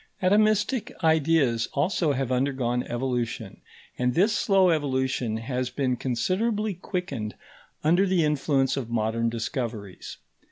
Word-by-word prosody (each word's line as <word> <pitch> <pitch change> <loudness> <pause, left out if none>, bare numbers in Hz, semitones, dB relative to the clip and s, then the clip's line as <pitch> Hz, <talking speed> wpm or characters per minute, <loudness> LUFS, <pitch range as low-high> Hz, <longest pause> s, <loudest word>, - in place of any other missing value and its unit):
Atomistic 215 +5 +2
ideas 155 -7 +3
also 160 +1 +1
have 130 -1 -2
undergone 125 -2 0
evolution, 120 -4 -3 0.4
and 125 0 +1
this 205 +5 +3
slow 190 -3 +4
evolution 130 -6 0
has 125 +2 -3
been 130 -2 -1
considerably 200 - -1
quickened 160 - -4 0.5
under 175 +6 +3
the 185 -3 +2
influence 140 -2 +1
of 125 -4 -4
modern 115 0 0
discoveries. 115 -4 -5
135 Hz, 115 wpm, -26 LUFS, 120-180 Hz, 0.5 s, slow